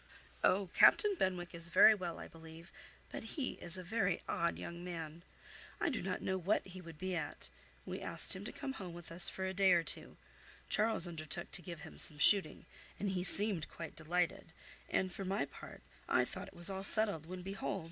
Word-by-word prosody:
"Oh! 190 -2 +2
Captain 420 -1 +5
Benwick 180 - -2
is 170 0 -4
very 195 +5 +7
well, 180 -5 -5
I - - -9
believe, 165 +1 -14 0.4
but - - -6
he 270 -4 -2
is 175 +1 -5
a 185 - -7
very 180 -2 -1
odd 170 0 -1
young 170 0 -8
man. 165 -2 -7 0.6
I - - 0
do 255 - -3
not 185 0 -4
know 190 0 -1
what 190 +4 0
he 185 0 -10
would 165 -3 -12
be 185 +2 -4
at. 170 - -2 0.4
We - - -6
asked - - -1
him - - -8
to - - -5
come 280 -4 -6
home 185 -8 -8
with 175 -1 -11
us 175 +1 +6
for 190 - -5
a 190 - -3
day 190 -1 +4
or 170 -1 +3
two: - - -5 0.5
Charles 215 -4 0
undertook 165 0 -6
to 180 - -1
give 170 -2 -9
him - - -11
some 150 - +11
shooting, 185 +1 +7 0.3
and 200 - -2
he 180 -1 -2
seemed 195 -4 +1
quite 165 - -9
delighted, 170 +2 -2 0.4
and, 185 -1 -1
for 195 - -7
my 195 +2 -1
part, - - -13 0.3
I - - +3
thought - - -7
it - - -15
was 175 +3 -3
all 190 0 -5
settled; 200 -6 -1
when 180 0 -8
behold! 195 +1 -4
180 Hz, 210 wpm, -35 LUFS, 170-195 Hz, 0.6 s, some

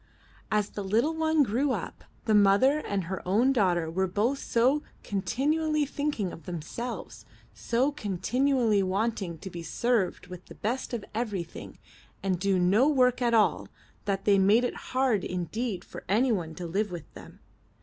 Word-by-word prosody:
As 210 -1 +1
the 205 - -5
little 230 +11 +1
one 320 -1 +2
grew 260 +4 +1
up, - - -6 0.2
the 220 - +2
mother 210 +8 +5
and 200 -9 -2
her 185 +2 -5
own 230 +9 +3
daughter 180 -8 +2
were 190 +4 0
both 220 +9 0
so 255 +6 +2 0.2
continually 300 +9 0
thinking 285 -9 -2
of 165 - -12
them 175 -2 -3
selves, 235 +8 -6 0.3
so 250 +5 0
continually 240 0 +1
wanting 195 -2 -1
to 190 - -8
be 170 - -6
served 205 +3 0
with 180 -1 -10
the - - -12
best 245 +5 -3
of 230 -4 -3
everything 205 -7 -4 0.5
and 185 -2 -1
to 200 - -1
do - - +3
no 200 +10 +4
work 255 -3 +3
at 235 -1 +3
all, 215 - +2 0.4
that 195 -1 -2
they 200 -1 +5
made 205 +5 +4
it 245 - -1
hard 255 -6 +1
indeed 185 +3 -3
for - - -10
anyone 200 -7 +1
to 180 - -6
live 200 +5 -1
with 175 -3 -8
them. - - -13
215 Hz, 170 wpm, -28 LUFS, 190-255 Hz, 0.5 s, mother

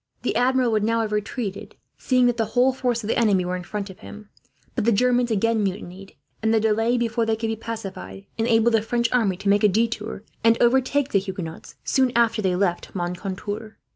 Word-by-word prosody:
The - - -1
Admiral 255 -1 +2
would 215 -1 +1
now 230 +1 +1
have 220 -1 -2
retreated, 210 -1 -4 0.2
seeing 255 -1 +2
that 245 -1 +2
the 225 - +1
whole 255 +2 +5
force 245 -3 -1
of - - -5
the 225 - +1
enemy 200 -6 +3
were 180 +1 -2
in 180 - -4
front 200 +2 -5
of 185 - -16
him; 210 0 -11 0.4
but 235 - -1
the 235 - +3
Germans 245 +2 +2
again 225 +1 +1
mutinied, 195 0 -5 0.3
and 220 0 +1
the 225 - +4
delay 225 +3 +2
before 235 -1 0
they 225 0 +1
could 225 0 -3
be 225 - -1
pacified 195 - -7
enabled 225 0 +2
the 225 - +4
French 235 +1 0
army 215 -7 +1
to 200 - -6
make 205 +1 +3
a - - +7
detour, 220 0 -1 0.2
and 230 0 +4
overtake 265 +3 +2
the 200 - +4
Huguenots 185 -4 -7
soon 260 -2 +2
after 230 -2 +3
they 185 -3 +1
left 180 -1 -1
Moncontour. 195 +4 -5
220 Hz, 210 wpm, -23 LUFS, 200-235 Hz, 0.4 s, a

